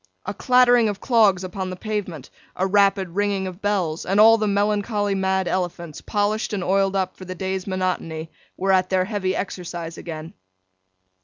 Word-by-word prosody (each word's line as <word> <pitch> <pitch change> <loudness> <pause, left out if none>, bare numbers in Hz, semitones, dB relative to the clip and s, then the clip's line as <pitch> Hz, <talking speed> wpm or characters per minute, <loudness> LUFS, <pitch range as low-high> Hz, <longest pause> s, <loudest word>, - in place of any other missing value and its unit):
A 200 - -3
clattering 245 -1 +4
of 205 - -4
clogs 210 -7 +3
upon 185 0 -4
the 185 - -5
pavement; 185 - -5 0.2
a 185 - 0
rapid 195 -1 +3
ringing 200 +1 -1
of 185 +1 -7
bells; 185 -6 -1
and 195 +2 0
all 225 +1 +8
the 215 - 0
melancholy 205 0 0
mad 190 -1 0
elephants, 175 -4 -3
polished 210 +1 -1
and 195 -3 -2
oiled 195 +1 +1
up 190 -1 -1
for 185 - -11
the 185 0 -6
day's 190 +1 -3
monotony, 180 -4 -3 0.3
were 195 +1 +1
at 185 -1 +3
their 185 -1 +2
heavy 190 -2 -2
exercise 175 -3 -5
again. 160 -1 -7
190 Hz, 170 wpm, -22 LUFS, 185-205 Hz, 0.3 s, all